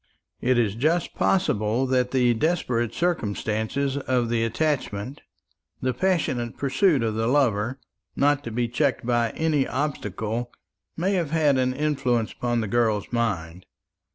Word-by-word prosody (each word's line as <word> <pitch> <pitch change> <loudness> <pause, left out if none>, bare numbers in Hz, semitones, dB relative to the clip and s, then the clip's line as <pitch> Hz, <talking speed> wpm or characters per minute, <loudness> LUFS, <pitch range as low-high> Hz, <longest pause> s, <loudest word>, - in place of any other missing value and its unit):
It 125 0 +2
is 110 -5 +2
just 155 +9 0
possible 115 - +1
that 125 -1 +1
the 125 -2 +3
desperate 120 -4 0
circumstances 135 - -1
of 125 -4 0
the 115 -1 +1
attachment, 125 -1 -2 0.6
the 130 0 -1
passionate 130 -7 0
pursuit 140 - +2
of 110 -1 0
the 110 +1 -1
lover, 125 -2 +1 0.4
not 145 0 +2
to 115 - -4
be 120 +2 0
checked 130 +1 0
by 120 -1 +2
any 155 -4 +1
obstacle, 120 -4 -3 0.5
may 185 +4 +1
have 175 -6 0
had 150 -4 +3
an 130 0 +1
influence 135 -6 0
upon 120 -1 -1
the 110 - -2
girl's 110 -1 0
mind. 95 -6 -2
125 Hz, 140 wpm, -25 LUFS, 115-145 Hz, 0.6 s, the